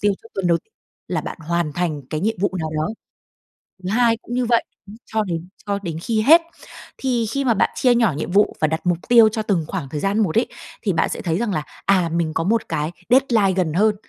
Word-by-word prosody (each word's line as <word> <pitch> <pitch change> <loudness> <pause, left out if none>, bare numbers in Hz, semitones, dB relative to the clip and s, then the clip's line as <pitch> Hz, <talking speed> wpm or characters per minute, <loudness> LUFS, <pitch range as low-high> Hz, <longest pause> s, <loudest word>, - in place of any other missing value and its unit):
tiêu 205 -1 +3
cho 225 - -15
tuần 190 -2 -1
đầu 170 -1 +3 0.5
là - - -1
bạn - - -7
hoàn 170 -3 0
thành 160 -3 -2
cái 155 - -2
nhiệm 220 +3 0
vụ 200 - +2
nào 160 -1 -3
đó. 155 +1 0 1.0
Thứ 185 - -3
hai 230 +1 +3
cũng 240 - -8
như 250 0 +1
vậy, 235 0 +3 0.4
cho 220 -1 -1
đến 170 -2 -4 0.2
cho 200 0 0
đến 165 -2 -4
khi 220 +4 0
hết. 320 +8 +7 0.6
Thì 245 -3 0
khi 275 +4 -1
mà 235 - +4
bạn 210 - +2
chia 250 -2 +3
nhỏ 230 -8 +3
nhiệm 165 - -4
vụ 205 +2 +3
và 155 - +3
đặt 160 +3 -3
mục 175 -2 +2
tiêu 230 -2 +7
cho 220 +1 -3
từng 195 -7 0
khoảng 135 - -4
thời 150 +1 -4
gian 200 +4 0
một 195 -5 +1
ấy, 235 - +3 0.3
thì 200 -6 0
bạn 165 - +1
sẽ - - -4
thấy 165 -1 -1
rằng 220 -2 -1
là: 155 -2 -1 0.2
"À, 185 -4 +3
mình 165 -2 0
có 165 - 0
một 225 +5 0
cái 150 +2 -1 0.2
deadline 240 -6 +4
gần 165 -4 +1
hơn 210 +3 +3
195 Hz, 245 wpm, -21 LUFS, 165-225 Hz, 1.0 s, hết